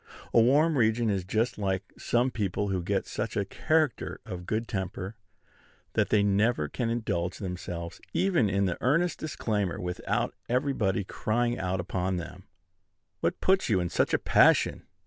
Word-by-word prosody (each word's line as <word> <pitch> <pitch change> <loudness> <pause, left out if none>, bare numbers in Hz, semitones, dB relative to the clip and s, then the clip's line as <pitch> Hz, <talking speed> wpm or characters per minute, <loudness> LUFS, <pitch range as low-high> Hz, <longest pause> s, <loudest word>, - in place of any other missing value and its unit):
A 115 - +7
warm 145 +5 +4
region 110 0 +2
is 95 -2 -1
just 110 +5 -1
like 95 -1 -2
some 120 +2 +1
people 100 -2 -1
who 95 -2 0
get 85 - -1
such - - -4
a 100 - +1
character 155 +9 0
for 100 -6 -5
good 110 +6 -3
temper, 95 +1 -4 0.8
that - - +1
they 105 -1 +4
never 100 -4 +2
can 115 - -2
indulge 100 -7 -1
themselves 90 -3 -6
even 175 - +2
in 100 0 +1
an 90 - -2
earnest 165 +7 +2
disclaimer 105 - -2
without 90 0 -2 0.2
everybody 120 -7 +1
crying 120 +5 -1
out 90 0 -1
upon 90 +1 -1
them, 90 +2 -8 0.7
"What - - -1
puts 190 -5 +3
you 100 -4 +3
in 90 -1 -1
such - - +1
a - - +4
passion?" - - +3
105 Hz, 160 wpm, -28 LUFS, 95-120 Hz, 0.8 s, A